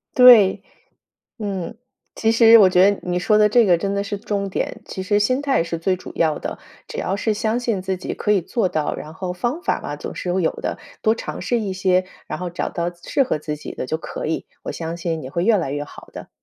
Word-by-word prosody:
对。 245 -7 +8 0.8
嗯， 200 0 -4 0.4
其 225 - +2
实 230 0 +8
我 200 -4 +7
觉 185 +2 +5
得 200 - -5
你 180 0 -1
说 210 +4 +3
的 210 0 +6
这 235 +2 +4
个， 180 -3 +4
真 195 +4 -2
的 200 - 0
是 205 0 -4
重 200 -1 -3
点， - - -3
其 190 - -6
实 205 +2 +2
心 255 +6 +1
态 275 -10 +1
是 170 0 -4
最 185 +3 0
主 185 - -10
要 160 -2 +1
的。 - - -6 0.3
只 - - -8
要 190 - -1
是 215 +2 0
相 220 +1 0
信 230 -6 -1
自 190 0 -2
己 185 - -5
可 210 - -1
以 195 - +2
做 205 +4 0
到， 155 -4 -1
然 155 - -8
后 180 +2 -4
方 240 - -2
法 - - 0
嘛， - - -5
总 - - -7
是 180 - -3
会 190 - +1
有 160 - +2
的， - - -3 0.2
多 220 +1 +3
尝 - - -6
试 240 - 0
一 200 - -3
些， 185 0 +2 0.2
然 - - -4
后 180 -1 -3
找 175 - -3
到 170 0 -2
适 175 +10 0
合 245 - -1
自 150 0 -4
己 150 - -8
的 - - -4
就 160 - -2
可 - - -6
以， 160 - -2 0.2
我 - - -4
相 165 +1 -5
信 165 -2 -3
你 130 - -7
会 170 +5 -1
越 225 0 +5
来 165 -9 -1
越 145 +1 -2
好 - - -13
的。 - - -9
190 Hz, 270 characters per minute, -21 LUFS, 170-215 Hz, 0.8 s, 对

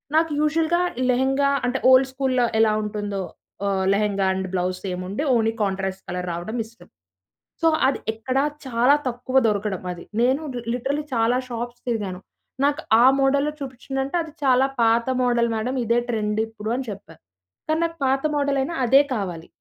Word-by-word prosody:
నాకు 320 0 +3
యూజువల్‌గా 325 +3 +2 0.3
లెహెంగా 270 +2 +2 0.2
అంటే, 265 +2 -1
ఓల్డ్ 260 +1 +6
స్కూలులో 260 -2 +1 0.2
ఎలా 215 -1 +4
ఉంటుందో 205 -2 -3 0.5
ఆహ్, 190 -1 0
lehenga 200 -1 +1
and 190 0 -3
blouse 180 0 -1
సేముండి 185 +7 -3
only 225 -1 +2
contrast 190 -1 -2
colour 180 0 -3
రావడం 175 +8 -5
ఇష్టం. 235 +1 -18 0.7
సో, 330 - +4 0.2
అది 270 - 0
ఎక్కడా 255 +5 -1 0.2
చాలా 255 +3 +4
తక్కువ 255 +2 -1
దొరకడం. 205 -3 -1
అది 175 - -10 0.2
నేను 260 +5 +2 0.2
లి - - -4
లిటరల్లీ 275 +4 -2
చాలా 230 +2 +2
షాప్స్ 240 0 -5
తిరిగాను. 205 -6 -2 0.5
నాకు 290 +2 +1 0.2
ఆ - - +7
మోడల్‌లో 280 +2 +2
చూపించ్ఛందంటే, 270 +2 -4
అది 320 - -10
చాలా 260 -1 +4 0.2
పాత 230 0 +3 0.2
మోడల్ 240 -1 +2
మేడం 245 +4 -2
ఇదే 235 +1 +2
ట్రెండ్ 215 -2 -1
ఇప్పుడు 220 -1 -7
అని 260 - -3
చెప్పారు. 165 -5 -10 0.5
కానీ, 315 +1 +1
నాకు 330 0 -5
పాత 270 +1 +1
మోడల్ 280 -1 +1
అయినా 330 +5 -3
అదే 270 +4 +6
కావాలి. 180 -7 -4
240 Hz, 160 wpm, -23 LUFS, 205-270 Hz, 0.7 s, ఆ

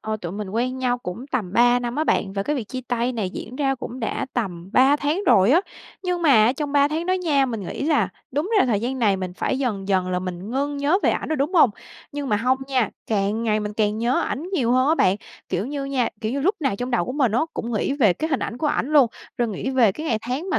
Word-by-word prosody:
ờ, 215 0 -3
tụi 175 -4 -6
mình 205 -1 -5
quen 250 +4 -1
nhau 245 -1 0
cũng 230 +3 -7
tầm 230 -10 -3
3 245 +2 +5
năm 240 +1 -4
á 310 - +1
bạn, 195 -10 +1
và 195 - -2
cái 295 +8 -1
việc 245 - -3
chia 255 - -4
tay 245 +1 0
này 215 -6 -2
diễn 235 +5 -8
ra 270 -2 +1
cũng 255 0 -7
đã 225 - -2
tầm 185 -7 -3
3 270 +4 +5
tháng 300 +7 -1
rồi 195 +4 +5
á. 335 +6 +5 0.4
Nhưng 360 -2 -1
mà 315 - +4
á, 235 - +3
trong 285 +1 -4
3 285 0 +4
tháng 320 +3 -2
đó 370 - +2
nha, 300 -7 +2
mình 225 -4 -4
nghĩ 190 - -5
là 300 0 +2 0.2
đúng 300 - -1
ra 385 - +4
thời 215 -5 +1
gian 255 +3 -2
này 210 -5 +3
mình 185 -1 -4
phải 260 - -1
dần 210 -8 -2
dần 185 -2 +1
là 180 - 0
mình 185 +2 -6
ngưng 285 +3 -1
nhớ 290 +6 +2
về - - +4
ảnh - - -2
rồi, 315 - 0
đúng 295 +7 -1
hông? 310 -9 +6 0.4
Nhưng 285 -1 -4
mà 210 - +2
hông 250 +4 +1
nha, 255 -5 +1 0.2
càng 210 +1 0
ngày 215 -2 +1
mình 210 0 -4
càng 210 0 0
nhớ 240 +3 +1
ảnh 310 +7 -3
nhiều 245 -10 +1
hơn 255 +2 +3
á 315 - +4
bạn. 190 - +3 0.3
Kiểu 190 +5 -1
như 280 0 -4
nha, 265 -4 0
kiểu 220 +1 -2
như, 280 - -1
lúc 380 +9 +2
nào 270 -9 0
trong 245 +4 -4
đầu 240 -8 +1
của 250 - -4
mình 260 -6 +1
á, 235 - +2
cũng 235 +1 -4
nghĩ 220 +5 0
về 245 -9 +4
cái 315 - -3
hình 275 - +1
ảnh 240 - -4
của 305 - 0
ảnh 290 - 0
luôn, 285 -4 +7 0.3
rồi 240 -1 +1
nghĩ 215 +5 -3
về 245 -6 +4
cái 310 +10 -6
ngày 225 -7 +1
tháng 260 +11 -3
mà - - +2
250 Hz, 285 wpm, -23 LUFS, 215-280 Hz, 0.4 s, luôn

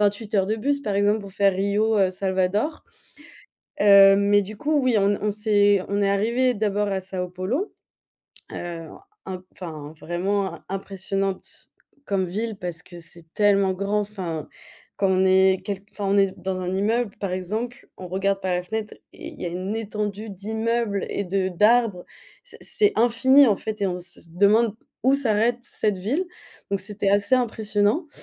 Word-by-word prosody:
28 210 +1 0
heures 190 -1 +3
de 215 +2 0
bus 280 +5 0
par 210 -6 -2
exemple 205 +2 +2
pour 200 -1 -10
faire 195 0 +3
Rio, 205 +3 +1
heu, 190 -2 +3
Salvador, 190 - -1 1.0
heu, 200 -1 +8
mais 205 0 +3
du 205 +2 -8
coup 300 +5 +1
oui 255 -2 +2
on 200 0 +2
on 210 - +1
s'est 205 -2 +3
on 200 +1 0
est 195 - +2
arrivés 235 +6 +2
d'abord 205 -1 0
à 195 -1 -1
São 185 -1 -5
Paulo, 215 - -2 0.8
heu, 170 -2 -6 0.4
un 185 -1 -6
enfin 155 -4 -8
vraiment 190 +4 -1
im - - -14
impressionnante 195 0 -4 0.4
comme 195 -5 0
ville 215 +4 -3
parce 175 -2 -5
que 175 - -12
c'est 170 0 -10
tellement 200 -2 +3
grand. 200 +3 -1
Enfin 185 -7 -5 0.5
quand 195 -1 +1
on 190 0 +3
est 190 0 +4
quelqu 200 -1 -4
enfin 205 -2 -4
on 195 - +2
est 195 -1 +2
dans 190 -1 -3
un 180 0 -3
immeuble 215 +2 0
par 195 -3 -2
exemple, 215 +7 -4
on 180 - -8
regarde 195 +1 0
par 185 -1 -1
la 180 - -1
fenêtre 220 +2 -4 0.2
et - - -9
il - - -12
y - - -2
a - - -1
une 185 +5 -3
étendue 210 -1 -4
d'immeubles 220 +1 -2
et 200 - -2
de 190 +1 0
d'arbres. 210 0 +3 0.4
C - - -11
c'est 415 -1 +2
infini 255 +4 +5
en 210 - +3
fait 215 -1 -5
et 195 - +3
on 180 -1 -2
se 175 0 -8 0.2
demande 210 +3 +4 0.3
où 265 +2 +5
s'arrête 235 -2 +1
cette 210 -4 -1
ville, 260 - -1 0.5
donc 200 -1 0
c'était 200 0 -1
assez 205 +5 +3
impressionnant. 220 - 0
200 Hz, 180 wpm, -24 LUFS, 190-220 Hz, 1.0 s, heu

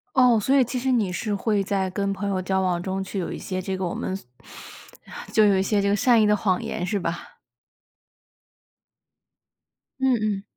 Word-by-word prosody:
哦， 250 -4 +5
所 265 +7 +1
以 270 - +6
其 250 +1 -3
实 260 +2 0
你 215 -6 +1
是 205 +3 -2
会 205 0 0
在 195 -1 -1
跟 200 +1 -2
朋 200 +1 -3
友 190 -2 -1
交 190 +1 0
往 180 -2 0
中 190 +1 -3
去 190 +1 -5
有 180 - -3
一 - - -5
些 185 -1 -4
这 190 +1 -3
个 190 0 -3
我 175 - -3
们 190 - -3
所 195 - -9 1.1
就 215 - +5
有 200 -2 +4
一 - - +2
些 205 0 +1
这 200 - +1
个 205 - +3
善 235 +1 +4
意 - - +4
的 210 0 +4
谎 190 -3 0
言 175 - -3
是 205 +3 -1
吧？ 170 -2 -5 2.6
嗯 265 -1 +3
嗯。 205 -2 -1
200 Hz, 220 characters per minute, -24 LUFS, 190-215 Hz, 2.6 s, 以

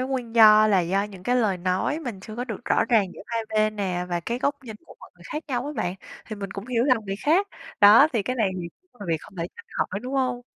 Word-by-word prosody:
nguyên 255 -3 -3
do 215 -1 +8
là 200 -3 +3
do 185 +3 0
những 200 -3 -9
cái 245 +5 +1
lời 215 -6 +1
nói 185 - -1
mình 240 -10 -6
chưa 215 +3 -10
có 245 - -3
được 235 -1 -7
rõ - - +2
ràng 225 -4 +3
giữa - - -11
hai 230 -1 -2
bên 215 0 +1
nè 185 -3 -2
và 175 -1 -2
cái 235 +8 -3
góc 285 0 -2
nhìn 220 -3 -8
của - - -14
mọi - - -14
người 175 - -19
khác 305 +2 -4
nhau 250 -1 -2
á 295 - -4
bạn, 180 -5 -2 0.3
thì 215 - -7
mình 200 -2 -6
cũng 195 +3 -7
hiểu 245 -2 0
lầm 250 -6 +2
người 195 -1 -4
khác. 360 +7 +3 0.3
Đó, 210 +8 +8
thì 225 -4 0
cái 255 +5 -3
này 215 -5 +1
thì 170 - -6 0.2
cũng 245 - -27
là 200 - -7
việc 165 - +1
không 195 - -15
thể 165 - -2
tránh - - -13
khỏi, 200 - -2
đúng 255 +3 -6
hông? 255 -2 -1
220 Hz, 285 wpm, -24 LUFS, 195-250 Hz, 0.3 s, do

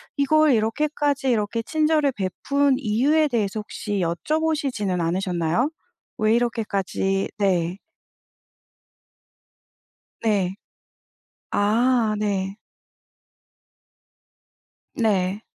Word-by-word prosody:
이걸 310 +2 +4
이렇게까지 285 +5 0
이렇게 230 0 0
친절을 305 +1 +1
베푼 270 +8 0
이유에 275 +6 +2
대해서 220 -5 -1
혹시 205 -1 -4
여쭤보시지는 245 - -1
않으셨나요? 175 - 0 0.5
왜 215 0 +3
이렇게까지 200 -4 -1
네. 180 -3 +1 2.5
네. 195 -4 +1 1.0
아 225 +2 +2
네. 200 -2 -1 2.4
네. 200 -3 0
220 Hz, 175 characters per minute, -23 LUFS, 195-275 Hz, 2.5 s, 이걸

